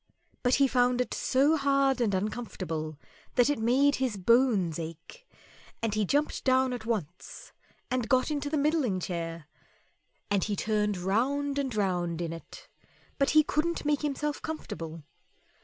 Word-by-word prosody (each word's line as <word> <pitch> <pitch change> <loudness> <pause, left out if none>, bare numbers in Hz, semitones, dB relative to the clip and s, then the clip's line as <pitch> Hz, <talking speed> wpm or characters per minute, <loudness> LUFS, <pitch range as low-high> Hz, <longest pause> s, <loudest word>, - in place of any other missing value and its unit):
But 245 0 +3
he 275 0 +4
found 250 -1 +2
it 250 - -1
so 280 +4 +2
hard 275 -2 +2
and 210 -5 +2
uncomfortable 185 -7 -4 0.4
that 250 +3 +4
it 290 - -2
made 265 +6 +3
his 255 -6 -1
bones 195 -5 +3
ache, 165 - -9 0.5
and 225 -2 -1
he 215 -1 +1
jumped 290 +9 0
down 260 -1 +3
at 230 -2 -6
once 185 -7 -5 0.4
and 250 -3 -1
got 255 +3 +3
into 290 -1 -2
the 305 - 0
middling 285 - +1
chair, 165 -3 -4 0.9
and 200 -2 +2
he 210 - -1
turned 210 -1 0
round 275 +10 0
and 265 -5 -2
round 175 -5 0
in 165 -1 -3
it, 165 - -11 0.5
but 275 - +3
he 310 - +8
couldn't 310 +2 -1
make 295 -1 +1
himself 295 0 -2
comfortable. 165 - -6
245 Hz, 155 wpm, -29 LUFS, 190-280 Hz, 0.9 s, he